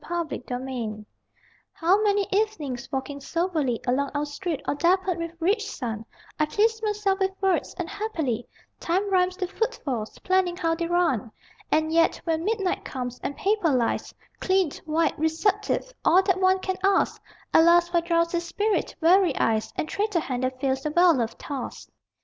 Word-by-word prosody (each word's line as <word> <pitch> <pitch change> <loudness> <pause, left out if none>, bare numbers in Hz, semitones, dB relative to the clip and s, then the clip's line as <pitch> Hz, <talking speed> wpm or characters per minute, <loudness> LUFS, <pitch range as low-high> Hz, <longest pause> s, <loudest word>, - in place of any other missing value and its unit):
_] - - -14
ARS 340 -5 -2 0.6
DURA 210 - -12 0.7
How 365 +5 +3
many 410 -1 +2
evenings, 385 - -1
walking 275 +1 -3
soberly 315 -7 -1
Along 270 +3 +1
our 290 +1 0
street 295 +2 -4
all - - +2
dappled 360 +3 +1
with 335 0 -6
rich 415 +5 +1
sun, 225 -4 -5 0.3
I 305 - +3
please 440 +6 +1
myself 415 -2 0
with 385 0 -1
words, 385 -2 0
and 355 -3 -3
happily 325 - -3 0.3
Time 385 +4 0
rhymes 365 -1 +2
to 370 -2 -2
footfalls, 305 - -3
planning 370 -2 +1
how 330 -3 +1
they 335 0 -2
run; 335 - +1 0.4
And 315 +1 +2
yet, 330 0 +3
when 325 -1 -1
midnight 400 -2 -1
comes, 250 -2 -5
and 285 - -4
paper 405 -4 +1
lies 250 -5 0 0.3
Clean, 375 -5 +2
white, 320 0 0
receptive, 410 +9 0
all 370 +3 +5
that 380 -1 +1
one 375 0 +4
can 375 -1 -2
ask, 390 0 +2 0.3
Alas 340 +1 +6
for 345 -1 +2
drowsy 335 0 +1
spirit, 405 +5 -1
weary 350 -2 +4
eyes 220 -1 +1
And - - -2
traitor 410 0 0
hand 255 -4 -3
that 255 0 -2
fails 265 0 0
the 300 - -2
well 345 +2 +5
loved 235 -5 -2
task! 275 -3 -6
340 Hz, 165 wpm, -25 LUFS, 290-385 Hz, 0.7 s, Alas